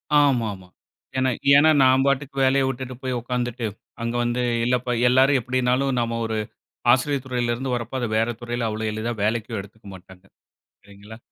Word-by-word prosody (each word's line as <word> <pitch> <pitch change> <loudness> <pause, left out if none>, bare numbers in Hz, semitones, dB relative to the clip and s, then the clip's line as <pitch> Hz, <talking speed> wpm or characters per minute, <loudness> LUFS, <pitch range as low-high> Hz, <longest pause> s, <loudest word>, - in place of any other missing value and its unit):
ஆமா, 135 -6 +3
ஆமா. 95 -1 -13 0.5
ஏன்னா 130 0 +2 0.3
ஏன்னா 155 +2 +6
நான் 130 +1 +4
பாட்டுக்கு 140 0 0
வேலைய 135 +1 +3
விட்டுட்டு 130 -1 -5
போய் 130 -1 -2
உக்காந்துட்டு, 120 -1 -3 0.3
அங்க 115 +1 -2
வந்து 120 +1 -1 0.2
இல்லப்பா 125 0 0 0.2
எல்லாரும் 130 +2 +4
எப்டின்னாலும் 130 +2 0
நாம 115 0 -1
ஒரு 110 -1 -2 0.5
ஆசிரிய 140 +2 +2
துறைல 120 -2 -1
இருந்து 130 0 -3
வரப்போ 120 +2 -5
அது 120 - -1
வேற 115 +2 +1
துறைல 120 -1 -2
அவ்ளோ 110 +1 -4
எளிதா 115 +2 -3
வேலைக்கும் 110 0 -1
எடுத்துக்க 105 +1 -16
மாட்டாங்க, 95 0 -16 0.6
இல்லைங்களா? 100 +2 -13
120 Hz, 160 wpm, -23 LUFS, 115-130 Hz, 0.6 s, ஏன்னா